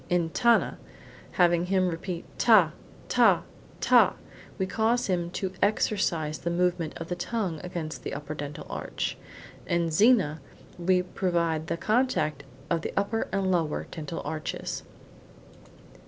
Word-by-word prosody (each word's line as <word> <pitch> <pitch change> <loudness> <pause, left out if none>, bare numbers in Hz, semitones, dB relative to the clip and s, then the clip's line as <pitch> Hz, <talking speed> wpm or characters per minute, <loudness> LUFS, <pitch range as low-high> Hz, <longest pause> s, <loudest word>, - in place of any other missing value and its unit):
In 175 -2 +1
tana, 235 +4 +3 0.5
having 175 -1 +3
him 185 -1 +2
repeat 170 +1 -5
ta, 205 -9 +6 0.4
ta, - - +4 0.4
ta, - - +5 0.4
we 190 - 0
cause 225 +5 +1
him 175 -3 -1
to 185 +1 -3
exercise 170 -7 +1
the 170 - -2
movement 175 -2 0
of 165 - -6
the 180 - -2
tongue 175 -3 -2
against 170 -4 -5
the - - -5
upper 150 +1 -5
dental 145 -1 -6
arch. - - -3 0.5
In 170 -1 +1
zina, 185 - +4 0.4
we 180 +1 +3
provoke 170 -4 -1
the - - -1
contact 215 - +1 0.2
of 170 -1 0
the - - -4
upper 200 +3 0
and 195 -1 0
lower 165 -4 0
dental 160 -1 -5
arches. 155 +1 -4
175 Hz, 135 wpm, -27 LUFS, 160-195 Hz, 0.5 s, ta